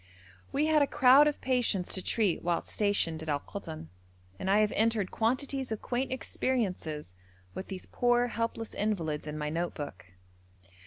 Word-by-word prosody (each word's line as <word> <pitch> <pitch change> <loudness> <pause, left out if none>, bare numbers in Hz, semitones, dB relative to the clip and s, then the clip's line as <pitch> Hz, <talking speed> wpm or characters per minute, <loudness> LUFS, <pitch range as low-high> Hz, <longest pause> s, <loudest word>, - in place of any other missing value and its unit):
We 290 +2 +1
had 310 -1 +4
a 285 - +4
crowd 270 +4 +6
of 295 - -1
patients 245 -8 0
to 190 - 0
treat 205 -3 +1
whilst 170 -1 -1
stationed 200 -6 0
at 160 - -6
Al 145 -1 +1
Koton, 160 - -8 0.5
and 190 - -2
I 205 +2 +5
have 210 - +2
entered 220 -3 +1
quantities 260 +2 -1
of 220 - -4
quaint 255 +2 -1
experiences 185 - -2 0.4
with 190 - -6
these 190 -2 -6
poor 245 0 +2
helpless 230 -1 -3
invalids 165 -8 -1
in 150 0 -4
my 150 0 -2
note 170 +2 -2
book. 95 - -7
210 Hz, 165 wpm, -30 LUFS, 165-245 Hz, 0.5 s, crowd